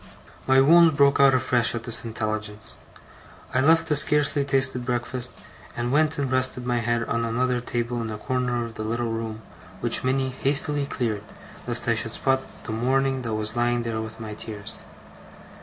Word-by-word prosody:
My 130 0 +5
wounds 160 +2 +5
broke 140 -1 +4
out 135 -1 +6
afresh 125 -2 +2
at 115 - -5
this 115 -1 -1
intelligence. 110 -1 -5 0.8
I 130 - +2
left 160 +3 +3
the 150 - +1
scarcely 145 0 +4
tasted 135 -2 +2
breakfast, 125 0 -2 0.4
and 120 +1 -2
went 155 +2 +2
and 140 -2 -2
rested 130 -1 +2
my 120 -1 0
head 115 0 -1
on 115 0 -2
another 125 +2 -1
table, 120 0 -3
in 115 - -4
a 105 - -5
corner 125 +1 -2
of 115 - -9
the 110 - -6
little 115 +1 -2
room, 110 -1 -5 0.4
which - - -1
Minnie 130 0 0
hastily 145 +1 +2
cleared, 115 -7 -2 0.5
lest - - +2
I - - +3
should - - -2
spot 135 0 +1 0.2
the - - -6
mourning 130 +3 0
that 115 -3 -3
was 110 +1 -3
lying 120 0 0
there 115 -1 -3
with 110 +1 -9
my 110 -1 -7
tears. 105 -1 -8
125 Hz, 180 wpm, -24 LUFS, 115-135 Hz, 0.8 s, out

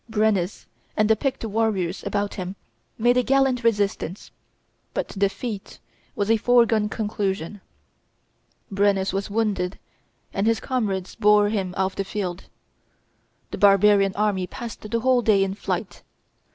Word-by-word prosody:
Brennus 210 -4 0 0.3
and 215 - +3
the 220 - +4
picked 265 +1 -2
warriors 210 -5 -1
about 205 0 -2
him 185 -1 -5 0.4
made 240 +2 +3
a - - +5
gallant 265 -1 +2
resistance, 205 -4 -1 0.6
but - - -2
defeat 200 +1 -3 0.4
was 205 +2 0
a 225 - +5
foregone 230 -2 +3
conclusion. 205 -3 -3 1.1
Brennus 195 -1 +1
was 195 +2 -2
wounded, 200 -4 -1 0.6
and 200 +2 0
his 225 -1 +2
comrades 205 -8 -2
bore 210 -1 +4
him 195 -4 -2
off 190 0 0
the 195 - -1
field. 190 -3 -4 1.1
The - - -5
barbarian 200 0 +5
army 200 -3 0
passed 235 +3 -8
the 225 +2 -2
whole 255 0 +3
day 205 -4 +3
in 195 0 -2
flight. 200 - -4
205 Hz, 135 wpm, -24 LUFS, 195-225 Hz, 1.1 s, a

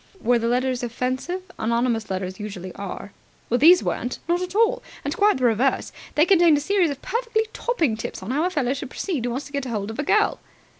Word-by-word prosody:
"Were 240 +1 +2
the 230 - -1
letters 250 +1 0
offensive? 255 +9 -3 0.2
Anonymous 235 0 0
letters 185 0 -4
usually 195 -3 -6
are." 200 0 -7 0.4
"These 315 +9 +6
weren't. 245 +1 -2
Not 345 +1 +1
at 365 +1 -5
all, 460 +3 +3 0.2
and 290 +3 -2
quite 415 -2 +3
the 260 - -4
reverse. 245 +3 +2 0.2
They 300 - +5
contained 345 -5 +5
a - - -2
series 380 +1 +2
of 280 -1 -6
perfectly 460 -2 0
topping 330 - 0
tips 220 - -6
on 205 - -4
how 295 +4 +1
a 360 - +2
fellow 280 -8 0
should 275 -1 -6
proceed 290 - -3
who - - 0
wants 255 +4 -3
to - - -12
get 280 -2 -2
hold 215 -4 -3
of 225 - -9
a - - +1
girl." 425 +8 +2
260 Hz, 215 wpm, -23 LUFS, 235-350 Hz, 0.4 s, These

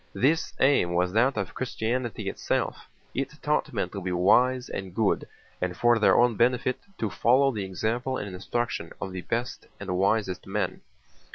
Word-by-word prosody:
This 155 +6 +2
aim 130 -11 +3
was 90 +1 +1
that 125 +4 +3
of 100 -3 -3
Christianity 120 -2 -2
itself. - - -2 0.3
It - - -3
taught - - +1
men - - -1
to 100 - -6
be 90 0 -3
wise 125 +8 +3
and 95 -2 -6
good 110 -3 +1 0.3
and 90 -1 -2
for 120 -1 +4
their 105 - +5
own 120 -2 +4
benefit 125 +2 +2 0.2
to 110 -3 -2
follow 130 +7 +4
the 105 -5 -3
example 120 +7 -2
and 100 - -5
instruction 120 +6 -3
of 95 - -4
the 90 -1 -5
best 120 +5 -3
and 95 -3 -3
wisest 95 0 0
men. - - -2
110 Hz, 170 wpm, -27 LUFS, 95-125 Hz, 0.3 s, their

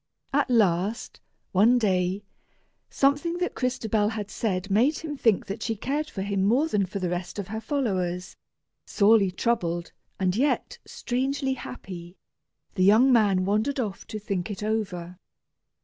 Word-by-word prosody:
At 280 -1 +2
last, 205 -2 +1 0.3
one 220 +6 +5
day, 190 -3 +1 0.7
something 290 +5 +1
that 360 0 -1
Crystabell 220 -4 0 0.2
said 195 -3 -2
made 250 +10 +3
him 305 -2 -5
think 225 -7 +2
that 200 +3 -6
she 225 0 -1
cared 290 +8 -2
for 190 - -4
him 200 -1 -1
more 245 +10 +3
than 205 -10 0
for 190 - -5
the 180 -3 -2
rest 175 +2 -4
of 200 -2 -5
her 220 +1 -4
followers. 185 - -2 0.5
Sorely 205 -2 +4
troubled, 175 -4 -1 0.3
and 185 -1 +1
yet 295 - 0
strangely 265 +2 -1
happy, 185 -8 -9 0.6
the 185 - +1
young 225 +7 +6
man 200 -5 +3
wandered 215 +8 0
off 210 -6 -4
to 215 - -5
think 200 -2 -3
it 205 0 -5
over. 185 -5 -3
210 Hz, 150 wpm, -26 LUFS, 185-250 Hz, 0.7 s, young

